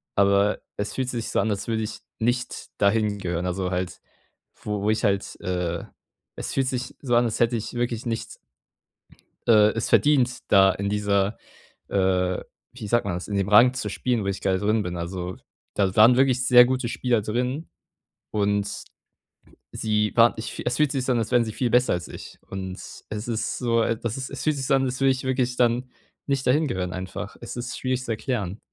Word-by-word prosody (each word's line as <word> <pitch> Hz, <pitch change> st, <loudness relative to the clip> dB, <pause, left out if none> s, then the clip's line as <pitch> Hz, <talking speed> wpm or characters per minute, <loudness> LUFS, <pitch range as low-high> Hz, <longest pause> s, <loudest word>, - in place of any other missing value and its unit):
aber 100 Hz, +1 st, +3 dB, 0.2 s
es 105 Hz, -, -3 dB
fühlte 130 Hz, -1 st, -2 dB
sich 115 Hz, -2 st, -3 dB
so -, -, 0 dB
an, 110 Hz, -, +1 dB
als 100 Hz, -, -3 dB
würde 110 Hz, -1 st, -1 dB
ich 110 Hz, -, -5 dB, 0.2 s
nicht 120 Hz, +2 st, -2 dB
dahin 105 Hz, 0 st, +2 dB
gehören. 90 Hz, -2 st, -2 dB
Also, 90 Hz, 0 st, -2 dB
halt 90 Hz, -1 st, -3 dB, 0.6 s
wo 105 Hz, -1 st, -2 dB
wo 105 Hz, -, +1 dB
ich 110 Hz, -, -1 dB
halt, 100 Hz, -2 st, 0 dB
äh 90 Hz, -2 st, -2 dB, 0.5 s
es -, -, -5 dB
fühlt 135 Hz, -1 st, +1 dB
sich 125 Hz, -1 st, -3 dB
so 120 Hz, -4 st, +1 dB
an, 120 Hz, -, +4 dB
als 115 Hz, -, -2 dB
hätte 120 Hz, +1 st, +3 dB
ich 110 Hz, -, -6 dB
wirklich 120 Hz, -1 st, -2 dB
nichts 115 Hz, -1 st, -4 dB, 1.1 s
äh, 105 Hz, -2 st, +6 dB
es 115 Hz, -, -2 dB
verdient, 130 Hz, -4 st, +3 dB
da 95 Hz, -1 st, +6 dB
in 100 Hz, 0 st, -3 dB
dieser, 100 Hz, 0 st, +1 dB, 0.5 s
äh, 90 Hz, -1 st, +1 dB, 0.3 s
wie 115 Hz, -5 st, -7 dB
sagt 120 Hz, +1 st, +2 dB
man 100 Hz, -3 st, -1 dB
das, 90 Hz, -, -6 dB
in 100 Hz, -, -3 dB
dem 100 Hz, 0 st, 0 dB
Rang 120 Hz, +5 st, +7 dB
zu 130 Hz, -, -3 dB
spielen, 120 Hz, -4 st, -1 dB
wo -, -, -3 dB
ich 100 Hz, -1 st, -2 dB
gerade 95 Hz, -1 st, +1 dB
drin 105 Hz, +1 st, +1 dB
bin. 90 Hz, -2 st, -4 dB
Also, 90 Hz, +1 st, -5 dB, 0.4 s
da 95 Hz, -2 st, +1 dB
waren 115 Hz, +3 st, +7 dB
wirklich 130 Hz, -1 st, +3 dB
sehr 125 Hz, 0 st, +8 dB
gute 130 Hz, -1 st, -1 dB
Spieler 120 Hz, -2 st, 0 dB
drin 125 Hz, +9 st, -2 dB, 0.6 s
und 100 Hz, -1 st, -1 dB, 0.9 s
sie 105 Hz, -1 st, 0 dB
waren 115 Hz, 0 st, +6 dB
ich 110 Hz, -, -5 dB
es 125 Hz, -, 0 dB
fühlt 150 Hz, -2 st, +3 dB
sich 130 Hz, -3 st, -2 dB
an, 125 Hz, -, +3 dB
als 110 Hz, +1 st, -3 dB
wären 120 Hz, -1 st, +4 dB
sie 110 Hz, -, -5 dB
viel 125 Hz, +1 st, -1 dB
besser 125 Hz, +2 st, +3 dB
als 90 Hz, -1 st, -3 dB
ich. -, -, -10 dB
Und 95 Hz, -1 st, -5 dB, 0.4 s
es 105 Hz, +1 st, -5 dB
ist 115 Hz, -1 st, -2 dB
so 115 Hz, -2 st, +2 dB
das 115 Hz, +1 st, -2 dB
ist 130 Hz, -1 st, -5 dB
es 140 Hz, -, -6 dB
fühlt 155 Hz, -1 st, +2 dB
sich 135 Hz, -, -3 dB
so 140 Hz, -, +2 dB
an, 135 Hz, -, +2 dB
als 125 Hz, 0 st, -3 dB
würde 135 Hz, -, +5 dB
ich 130 Hz, 0 st, -2 dB
wirklich 125 Hz, -1 st, 0 dB
dann, 120 Hz, +1 st, +2 dB, 0.4 s
nicht 135 Hz, -2 st, 0 dB
dahin 150 Hz, +5 st, +3 dB
gehören 95 Hz, -7 st, -3 dB
einfach. 95 Hz, +3 st, -6 dB
Es 120 Hz, -, -7 dB
ist 125 Hz, +1 st, -4 dB
schwierig 130 Hz, 0 st, -1 dB
zu 120 Hz, -, -3 dB
erklären. 110 Hz, -4 st, -3 dB
110 Hz, 205 wpm, -24 LUFS, 100-125 Hz, 1.1 s, sehr